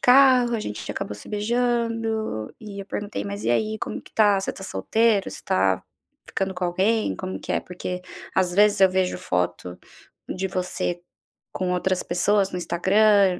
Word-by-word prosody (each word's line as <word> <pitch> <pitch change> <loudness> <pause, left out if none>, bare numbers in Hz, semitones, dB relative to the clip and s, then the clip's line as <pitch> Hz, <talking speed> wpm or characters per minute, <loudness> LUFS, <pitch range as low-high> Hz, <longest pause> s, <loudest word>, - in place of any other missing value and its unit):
carro, 250 -2 +6
a - - -3
gente 105 - -5
acabou 105 - -4
se 105 - -11
beijando 225 - -1
e 205 -2 -7
eu - - -15
perguntei: 205 - -4
"Mas 100 +1 -5
e 115 - +2
aí, 215 - 0
como - - -4
que - - -18
tá? 205 -3 +4
Você - - -2
tá 190 - -8
solteiro? 220 0 +1
Você - - -7
tá 95 0 +2 0.5
ficando 190 0 -2
com 180 0 -2
alguém? 195 +6 +1
Como 185 0 -5
que - - -4
é? - - +1
Porque 180 0 -6 0.3
às 185 -2 +2
vezes 205 0 +4
eu 190 -1 +7
vejo 185 -1 +1
foto 90 - -2 0.5
de 190 +1 -2
você 180 -1 -2 0.5
com 185 -1 -1
outras 180 +1 0
pessoas 195 +3 +2
no 180 - -2
Instagram, 195 +2 +4
190 Hz, 175 wpm, -24 LUFS, 180-215 Hz, 0.5 s, eu